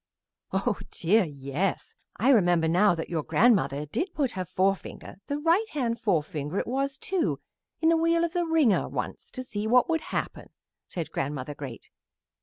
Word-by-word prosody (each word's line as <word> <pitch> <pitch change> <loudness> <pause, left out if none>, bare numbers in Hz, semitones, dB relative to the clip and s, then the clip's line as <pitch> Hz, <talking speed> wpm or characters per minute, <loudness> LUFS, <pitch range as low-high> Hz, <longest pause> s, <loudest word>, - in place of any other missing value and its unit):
"Oh 195 +3 0
dear, 195 +5 +2
yes; 145 +5 -3 0.2
I 240 +7 +2
remember 175 -8 +4
now 180 +3 +4
that 165 - -5
your 165 -2 0
grandmother 155 - +2
did 340 - -3
put 275 -5 +1
her 185 -1 -4
forefinger, 190 +2 -2
the 285 - -1
right 340 +9 +2
hand 235 -5 -1
forefinger 155 -5 -1
it - - 0
was, 270 +2 -1
too, 365 +3 -1 0.4
in 320 - +4
the 330 - +4
wheel 335 +1 +2
of 340 0 -1
the 350 -2 0
wringer 310 -11 +3
once - - -5
to 255 - -6
see 215 -3 -4
what 250 +5 +4
would 325 -1 +1
happen," - - -4 0.4
said 170 -3 -5
Grandmother 140 0 -3
Great. 135 -5 -9
210 Hz, 170 wpm, -27 LUFS, -, 0.4 s, remember